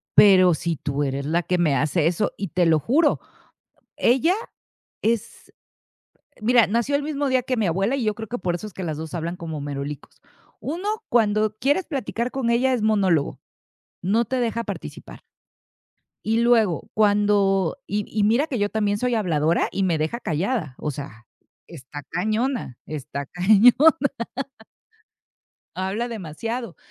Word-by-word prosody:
"Pero 185 -3 +7
si 165 0 -2
tú 145 0 -2
eres 135 0 -2
la 165 +4 +1
que 180 - 0
me 155 -5 +3
hace 150 +4 +1
eso" 180 +5 0
y 195 - -4
te 175 +2 +1
lo 160 -1 +4
juro, 290 - +2 0.8
ella 265 +9 +3 0.7
es, 230 0 -2 0.9
mira, 235 0 +5
nació 235 +7 +1
el 285 - -2
mismo 290 -2 -1
día 260 -1 +2
que 255 0 -2
mi 215 - +1
abuela 195 +9 +1
y 255 - -2
yo 215 - +1
creo 220 -1 -7
que 245 - -4
por 180 -2 -1
eso 215 - -8
es - - -14
que 190 - -5
las 155 -2 -3
dos 160 +1 -6
hablan 170 +1 -3
como 160 -3 -6
merolicos. 140 0 -6 0.4
Uno, 345 +8 -4 0.2
cuando 215 -2 +2
quieres 290 +8 +1
platicar 250 - -3
con 265 -3 -1
ella 250 +3 +2
es 245 - -1
monólogo. 195 -9 +1 0.6
No 215 +6 +2
te 260 +4 -2
deja 230 -1 -1
participar. - - -8 1.0
Y 225 +1 +1
luego 225 -7 +2
cuando 205 -3 +2
y 205 +1 -2
y 215 - -1
mira 230 +8 +3
que 270 -7 -3
yo 205 - +2
también 205 -1 0
soy 245 +2 0
habladora 165 -5 +1
y 195 - -1
me 175 -4 +1
deja 160 +11 -2
callada. 165 - -2
O 150 - -3
sea, 125 -5 -9 0.4
está 145 -2 -10
cañona, 220 - -1
está 140 -2 -5
cañona. 205 +8 +5 2.0
Habla 195 +6 -2
demasiado. 225 +2 -5
205 Hz, 160 wpm, -23 LUFS, 165-235 Hz, 2.0 s, Pero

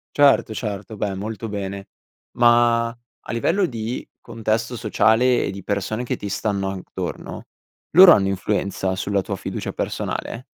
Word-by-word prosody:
Certo, 140 -6 +4
certo. 105 0 -5
Beh, 100 -1 -2
molto 110 +3 -5
bene, 100 -1 -5 0.5
ma 120 -1 +4
a 120 +1 -13
livello 170 - +1
di 115 -3 -4
contesto 115 +1 -2
sociale 115 +2 +3
e - - -2
di 95 -1 -8
persone 105 +4 -2
che - - -3
ti 100 - -6
stanno 100 -1 -1
attorno, 95 -1 -6 0.5
loro 180 +1 +10
hanno 95 -8 +5
influenza 95 0 -1
sulla 100 +1 0
tua - - -4
fiducia - - -5
personale? 120 +2 -4
110 Hz, 140 wpm, -22 LUFS, 100-120 Hz, 0.5 s, loro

